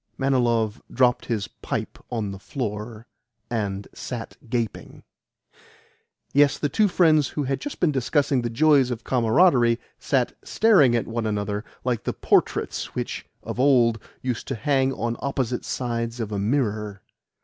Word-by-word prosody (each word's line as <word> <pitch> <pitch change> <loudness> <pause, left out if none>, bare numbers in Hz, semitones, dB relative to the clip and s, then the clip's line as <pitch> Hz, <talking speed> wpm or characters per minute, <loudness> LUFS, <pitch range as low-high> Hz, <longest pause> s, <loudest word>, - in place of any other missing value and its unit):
Manilov 120 -5 +1
dropped 125 -2 +2
his 110 -4 -1
pipe - - -5
on 110 -5 -2
the 95 - -8
floor, 110 -1 -5 0.5
and 100 -3 -2
sat 120 -3 -6
gaping. 115 -3 -3 1.3
Yes, 145 0 +4
the 145 - -1
two 215 +5 +3
friends 160 -6 +4
who 150 - -3
had 135 0 -2
just 290 - -6
been 170 - +3
discussing 135 0 +1
the 120 - -2
joys 140 +1 +4
of 120 -2 -4
camaraderie 120 -1 +3 0.2
sat - - 0
staring 185 - +4
at 115 - 0
one 115 -1 -2
another 105 0 -2 0.2
like 120 -3 -1
the - - -2
portraits - - 0
which, - - -4 0.2
of - - -5
old, 120 -4 +4 0.2
used 125 -3 -3
to 135 - -2
hang 135 +1 +1
on 120 -2 -2
opposite 130 -3 -2
sides 115 -1 -3
of 110 -2 -3
a 100 - -2
mirror. 105 -3 -1
120 Hz, 150 wpm, -24 LUFS, 110-135 Hz, 1.3 s, Yes